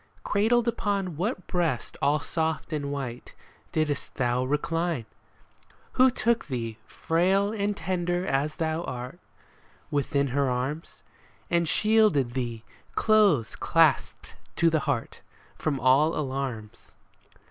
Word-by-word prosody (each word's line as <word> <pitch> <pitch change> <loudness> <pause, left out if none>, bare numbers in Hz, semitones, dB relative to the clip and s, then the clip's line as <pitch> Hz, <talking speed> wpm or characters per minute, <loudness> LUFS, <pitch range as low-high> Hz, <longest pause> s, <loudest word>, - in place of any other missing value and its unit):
Cradled 225 +3 +2
upon 200 -6 -1
what 185 - -2
breast 165 -9 -1
all 145 +1 +2
soft 160 +1 -2
and 145 -2 -2
white 130 -4 -6 0.4
Didst 150 -3 -2
thou 125 -1 +1
recline? 150 0 -1 0.9
Who 255 +1 +5
took 235 -2 0
thee, 115 -5 -4
frail 190 +5 +1
and 205 -1 -1
tender 175 0 -1
as 145 -1 0
thou 160 0 -1
art, 125 +7 -6 0.7
Within 140 -1 0
her 140 +1 +1
arms? 130 +6 -4 0.5
And 170 -2 +2
shielded 210 - +3
thee, 120 -3 -3 0.3
close 205 - +3
clasped - - +1 0.2
to 170 -1 +3
her 160 - +2
heart. 140 -6 -3 0.3
From 145 -4 -2
all 135 +6 +4
alarms 130 -7 -5
155 Hz, 115 wpm, -27 LUFS, 130-185 Hz, 0.9 s, Who